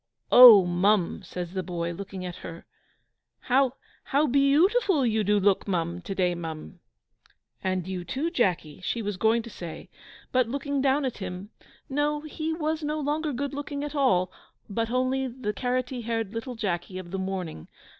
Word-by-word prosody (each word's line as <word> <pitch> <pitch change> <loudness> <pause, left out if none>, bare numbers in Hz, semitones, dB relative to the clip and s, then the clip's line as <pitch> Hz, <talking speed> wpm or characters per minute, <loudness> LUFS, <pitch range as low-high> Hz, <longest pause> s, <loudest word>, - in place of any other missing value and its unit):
"Oh, 230 -7 +10
mum!" 180 +2 +2
says 180 -1 -6
the 190 - -1
boy, 170 -2 -3
looking 190 +1 -7
at 175 -1 -6
her, 165 +1 -9 0.8
"how 260 0 +2 0.3
how 285 +3 +2
beyoutiful 300 - +3
you 220 -1 +1
do 205 +1 +3
look, 200 0 +2
mum, 175 -2 -1
to 195 - -5
day, 180 -2 +1
mum!" 160 - -7 0.8
"And 185 -1 -1
you, 185 -2 -4
too, 275 - -2
Jacky," 180 - 0
she 230 +2 -2
was 205 -1 -2
going 225 +3 +2
to 235 - -9
say; 170 -5 -9 0.4
but, 255 -2 +2
looking 280 +1 -2
down 275 +1 +2
at 255 - -4
him 190 +2 -6 0.4
no, 295 +1 0
he 310 +1 -4
was 320 0 -2
no 300 +1 -1
longer 300 +1 -1
good 280 +2 -3
looking 285 0 -4
at 295 0 -5
all 190 -11 +2 0.4
but 225 +2 -2
only 255 +2 0
the 240 -4 -4
carrotty 250 +2 -2
haired 225 -2 -3
little 240 +2 -5
Jacky 185 -4 -3
of 180 -2 -8
the 195 - -3
morning. 185 - -4
225 Hz, 170 wpm, -27 LUFS, 185-275 Hz, 0.8 s, Oh